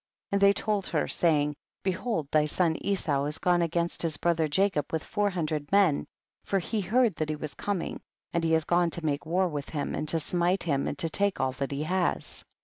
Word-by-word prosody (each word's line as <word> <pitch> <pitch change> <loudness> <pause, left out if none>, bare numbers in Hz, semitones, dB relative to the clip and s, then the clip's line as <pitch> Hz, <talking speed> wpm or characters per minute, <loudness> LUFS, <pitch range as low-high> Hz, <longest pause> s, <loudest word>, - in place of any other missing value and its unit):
70. - - +1
And 200 - +1
they 200 0 +7
told 205 -2 -1
her, - - 0
saying, 150 -3 +2 0.3
be 190 - +2
hold 180 - -3
thy 150 -1 +3
son 165 +1 +1
Esau 155 -8 0
has 150 +1 -2
gone 175 +1 +2
against 170 0 -1
his 160 -3 0
brother 165 -1 +1
Jacob 155 -2 +1
with 160 -2 -1
four 205 -1 0
hundred 155 -5 -3
men, 195 -7 +3 0.4
for 195 - 0
he 210 +4 -1
heard 225 +3 +3
that 155 -1 -1
he 155 - -1
was 150 0 -6
com 200 -4 -2
ing, - - -6 0.3
and 170 - 0
he 160 0 +3
is 160 - +2
gone 175 +2 +2
to 165 0 -5
make 145 0 -1
war 185 +3 +2
with 145 -4 -5
him, 145 -2 -3
and 155 - -3
to 165 - +2
smite 175 +4 0
him 140 -5 0
and 145 - -3
to 165 - 0
take 200 +1 +1
all 130 0 +1
that 135 +1 -3
he 140 +2 -2
has. 180 +2 -1
170 Hz, 235 wpm, -28 LUFS, 150-190 Hz, 0.4 s, they